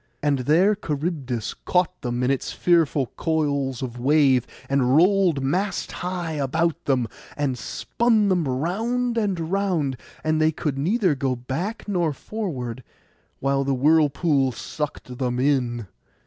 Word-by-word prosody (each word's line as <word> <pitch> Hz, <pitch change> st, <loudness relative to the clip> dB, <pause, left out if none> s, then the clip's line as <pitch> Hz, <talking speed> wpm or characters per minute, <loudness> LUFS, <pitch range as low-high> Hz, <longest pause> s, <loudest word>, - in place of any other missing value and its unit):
And 145 Hz, -2 st, +2 dB
there 165 Hz, +11 st, +4 dB
Charybdis 145 Hz, -, -3 dB
caught 180 Hz, 0 st, +1 dB
them 120 Hz, 0 st, -2 dB
in 125 Hz, -, +2 dB
its 135 Hz, -, -2 dB
fearful 165 Hz, -5 st, +2 dB
coils 140 Hz, -5 st, 0 dB
of 120 Hz, -1 st, -5 dB
wave, 135 Hz, -2 st, +3 dB, 0.2 s
and 135 Hz, -1 st, +2 dB
rolled 180 Hz, -5 st, +4 dB
mast 185 Hz, +9 st, -1 dB
high 180 Hz, -2 st, -3 dB
about 160 Hz, +4 st, -1 dB
them, 130 Hz, -4 st, +1 dB, 0.3 s
and 140 Hz, -3 st, 0 dB
spun 220 Hz, -, +1 dB
them 180 Hz, -6 st, +1 dB
round 225 Hz, -, -1 dB
and 190 Hz, -7 st, -1 dB
round; 180 Hz, -10 st, 0 dB, 0.3 s
and 155 Hz, 0 st, +1 dB
they 155 Hz, 0 st, +4 dB
could 145 Hz, -3 st, -3 dB
go -, -, -2 dB
neither 185 Hz, -1 st, +2 dB, 0.2 s
back 160 Hz, -, -4 dB
nor 175 Hz, -6 st, +1 dB
forward, 130 Hz, -, -5 dB, 0.6 s
while 135 Hz, 0 st, +1 dB
the 135 Hz, 0 st, 0 dB
whirlpool 145 Hz, -1 st, +3 dB
sucked 135 Hz, -1 st, -6 dB
them 125 Hz, -2 st, -1 dB
in. 125 Hz, -4 st, +1 dB
150 Hz, 135 wpm, -24 LUFS, 130-180 Hz, 0.6 s, there